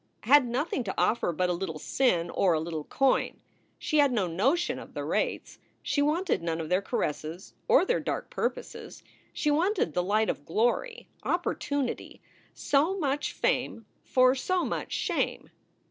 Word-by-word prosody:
had 265 +2 +5
nothing 260 +2 -1
to 195 - -4
offer 230 -5 +2
but 180 +2 0
a 180 - 0
little 170 -3 -4
sin 175 - +1
or 185 -3 +2
a 160 - +1
little 160 -2 -4
coin. 270 -1 +1 0.4
She 305 - 0
had 285 -2 +5
no 215 -6 +1
notion 255 - 0
of - - -12
the - - -3
rates. - - -2 0.2
She 285 - 0
wanted 320 - +1
none 165 -1 -2
of 160 -1 -4
their 185 +2 +2
caresses 165 -4 -4
or - - +5
their 485 - +1
dark - - -4
purposes. - - -4 0.3
She 300 - 0
wanted 340 - +1
the 180 - +1
light 210 +4 +1
of - - -3
glory, 240 - -1
opportunity; 285 -4 -2 0.3
so 305 +7 +1
much 290 -4 -1
fame - - -1 0.2
for 255 -1 +4
so 360 +7 0
much - - -4
shame. - - -2
245 Hz, 160 wpm, -28 LUFS, 175-290 Hz, 0.4 s, had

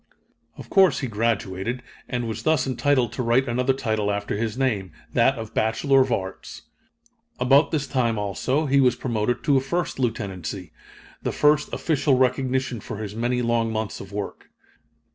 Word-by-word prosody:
Of - - -11
course 190 -8 +5
he 130 - -2
graduated, 110 0 -2 0.3
and 120 -1 -2
was 110 -1 -4
thus 155 0 +2
entitled 130 -1 +1
to - - -3
write 125 +3 +2
another 125 +3 +1
title 110 -5 -1
after 100 0 -2
his 110 +2 -2
name 110 -9 0 0.2
that - - +3
of 110 0 -7
Bachelor 135 +5 +3
of 130 -1 0
Arts. 95 -4 -4 0.8
About 135 +4 +5
this 150 -3 -1
time, 120 -5 0
also, 115 +9 -1
he 140 0 +3
was 125 -2 +4
promoted 120 -1 -1
to 140 -2 +3
a - - +2
first 170 +3 -2
lieutenancy, 100 - -3 0.5
the - - -2
first 150 0 +2
official 145 -4 +1
recognition 130 -1 0
for 105 - -7
his 105 -1 -5
many 120 +2 0
long 115 -1 +1
months 110 -1 -3
of 95 - -10
work. 100 0 -6
120 Hz, 165 wpm, -24 LUFS, 110-135 Hz, 0.8 s, course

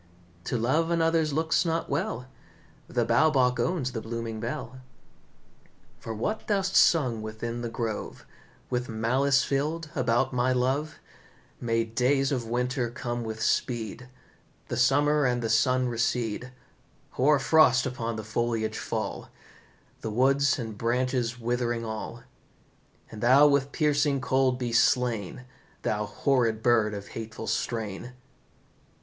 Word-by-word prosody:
To 125 - -1
love 135 +9 +1
another's 165 -2 +2
looks 160 +2 +1
not 165 -1 -1
well, 125 +3 -2 0.6
The 120 -2 0
Bow 120 +7 +4
Bach 125 -4 +2
owns 160 -8 0
the 115 - -4
blooming 115 -1 -5
belle." 125 +2 -5 1.2
"For 115 - -7
what 115 - -3
thou'st 195 -2 0
sung 125 -9 +4
within 115 +2 -5
the 120 - -3
grove, 115 -2 -5 0.5
With 125 0 -1
malice 130 +5 +2
filled, 155 +3 -2
about 130 0 +1
my 125 +1 +2
love, 135 +5 0 0.6
May 115 -1 0
days 130 +5 +1
of 125 -4 -2
winter 125 +1 -1
come 120 0 -4
with 110 0 -4
speed, 120 +1 -1 0.6
The - - -2
summer 145 +4 +3
and 125 -1 +1
the 115 - 0
sun 125 +2 +3
recede; 120 0 -1 0.6
Hoar 145 +3 +3
frost 135 -2 +4
upon 115 -3 -3
the 110 - -5
foliage 110 0 -2
fall, - - -4 0.7
The 110 - -4
wood 135 +5 +2 0.2
and 115 -4 -5
branches 125 +1 -1
withering 120 0 -1
all. 110 -1 -6 0.9
And 110 - -9
thou 130 +5 +6
with 140 -1 +2
piercing 145 -2 +1
cold 130 0 +1
be 120 -2 -3
slain, 125 -2 +1 0.4
Thou 105 +1 -1
horrid 115 -1 0
bird 110 -4 +3
of 100 0 -8
hateful 115 0 -7
strain!" 110 +1 -3
125 Hz, 130 wpm, -27 LUFS, 115-135 Hz, 1.2 s, thou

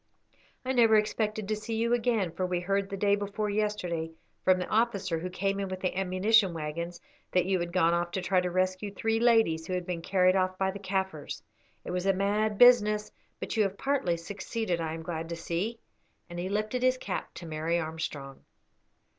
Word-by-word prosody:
"I 260 - 0
never 230 -4 +5
expected 215 0 0
to 215 - 0
see 215 +2 -4
you 230 +2 +1
again, 230 -7 +1
for 175 +3 -4
we 180 -1 -1
heard 195 +2 -1
the 200 - -4
day 200 +1 +3
before 205 +1 -3
yesterday 190 -6 -1 0.3
from 185 0 +5
the 180 - -2
officer 200 -7 0
who 180 +3 -4
came 195 +2 -1
in 195 - -2
with 185 0 -5
the 185 - -1
ammunition 190 +1 +3
waggons 165 +3 -4 0.3
that 180 -1 +3
you 190 0 +1
had 170 0 -3
gone 170 -2 +3
off 175 0 0
to 190 - -1
try 185 -1 +2
to 180 - -1
rescue 185 +3 -1
three 225 +2 0
ladies 225 -9 +3
who 185 - -3
had 180 -1 -2
been 175 -2 -3
carried 185 +1 +3
off 185 -1 +1
by 190 0 +1
the 200 - -8
Kaffirs. 190 -6 -3 0.4
It - - -4
was 180 +1 -1
a 195 - +5
mad 205 +2 0
business, 210 -3 +5 0.3
but - - -4
you 220 - +3
have 195 -1 0
partly 270 -12 0
succeeded, 195 +1 -3
I 160 -1 -2
am 165 - -7
glad 165 -1 -4
to 170 - -3
see," 175 +7 -3 0.5
and 175 - -5
he 180 +2 -3
lifted 215 +4 -1
his 255 0 +3
cap 200 -6 -5
to 175 - -8
Mary 160 +1 -1
Armstrong. 155 -4 -5
190 Hz, 205 wpm, -29 LUFS, 175-215 Hz, 0.5 s, never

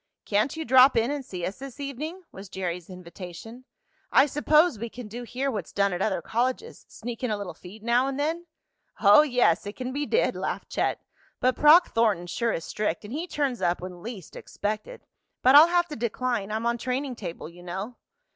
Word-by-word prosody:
"Can't 215 +9 0
you 320 - -4
drop 260 +2 +6
in 230 +4 +2
and 290 -1 -3
see 180 -7 -5
us 195 - -5
this 270 0 -9
evening?" 300 +7 -5
was 195 0 -11
Jerry's 180 -2 -4
invitation. 180 +6 -10 0.5
"I - - +6
suppose 300 - +3
we 235 +1 -4
can 240 0 -9
do 235 +4 -7
here 255 +3 -3
what's 205 -8 -5
done 200 -1 +1
at 175 - -3
other 190 -5 0
colleges 255 - -2
sneak 235 +2 -7
in 250 - 0
a 210 - -1
little 200 -3 -6
feed 205 +4 -13
now 240 +3 +2
and 275 0 -3
then?" 330 +4 -2 0.5
"Oh, 205 +5 +8
yes, 245 - +2
it 205 - -6
can 255 0 -5
be 290 +1 -2
did!" 475 - +1
laughed - - -4
Chet. - - -1 0.4
"But 255 0 +2
Proc 310 +4 +6
Thornton 215 -6 +2
sure 230 +6 -1
is 165 - -3
strict, 210 -6 -2
and 215 - -8
he 325 +5 -3
turns 280 -7 -2
up 175 0 +1
when 180 -1 -8
least 215 -5 -8
expected. 215 - -5 0.4
But 260 - +6
I'll 300 +3 +10
have 345 0 +2
to 300 - -5
decline. 235 -2 -2
I'm 220 +2 -2
on 235 0 0
training 255 +2 -2
table 175 -8 -7
you 170 +2 -14
know." 190 +7 -6
235 Hz, 205 wpm, -26 LUFS, 200-275 Hz, 0.5 s, I'll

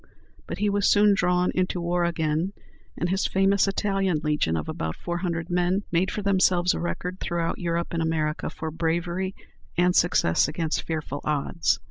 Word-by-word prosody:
But - - -4
he 210 +1 +1
was 200 -1 +2
soon 205 0 +5
drawn 180 -1 +2
into 185 0 0
war 175 0 0
again, 165 +2 -1 0.4
and 175 - -1
his 190 +1 +1
famous 195 +1 +3
"Italian 195 -4 0
Legion," 150 - +1
of 80 - -4
about 80 0 -3
four 175 0 -4
hundred 170 -1 -3
men, 180 +3 +1
made 175 +3 +2
for 210 - -4
themselves 185 -2 +3
a - - -3
record 130 - -4
throughout 170 -1 -2
Europe 170 -1 -1
and 165 - 0
America 155 -1 -1
for 160 0 -5
bravery 170 +4 -1 0.4
and 180 +1 +3
success 110 - +3
against 160 +1 -1
fearful 155 -3 -4
odds. 140 - 0
175 Hz, 170 wpm, -25 LUFS, 160-185 Hz, 0.4 s, soon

